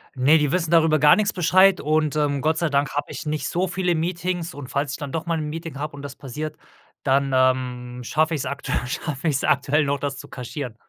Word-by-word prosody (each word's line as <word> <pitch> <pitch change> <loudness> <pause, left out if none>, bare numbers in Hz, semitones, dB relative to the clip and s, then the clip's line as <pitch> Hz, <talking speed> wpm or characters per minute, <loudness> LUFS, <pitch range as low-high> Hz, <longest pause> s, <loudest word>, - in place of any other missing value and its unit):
Ne, 140 +5 +5
die 150 -2 +1
wissen 170 -3 0
darüber 160 -2 +4
gar 150 0 +7
nix 210 -1 +1
Bescheid 185 +2 +4
und, 155 0 +1
ähm, 145 -2 +1
Gott 160 +1 +1
sei 170 - +1
Dank 140 -1 0
habe 145 - -2
ich - - -6
nicht 150 0 -2
so 185 +2 0
viele 180 -1 0
Meetings 175 +1 -2
und 140 -3 -8
falls 140 0 -2
ich - - -4
dann 145 -3 -6
doch 165 - -3
mal 165 -1 0
'n 150 - -3
Meeting 165 -2 -6
habe 150 -1 -4
und 140 - -9
das 140 -1 -8
passiert, 150 +3 -6 0.5
dann, 135 0 +2
ähm, 125 -1 0
schaffe 155 +6 +1
ich's 140 - -3
aktuell 140 -2 -2
schaffe 150 +1 -2
ich's 140 -2 0
aktuell 145 +2 +2
noch, 140 0 -1
das 140 -1 -3
zu - - -9
kaschieren. 125 -1 -6
150 Hz, 230 wpm, -23 LUFS, 140-165 Hz, 0.5 s, gar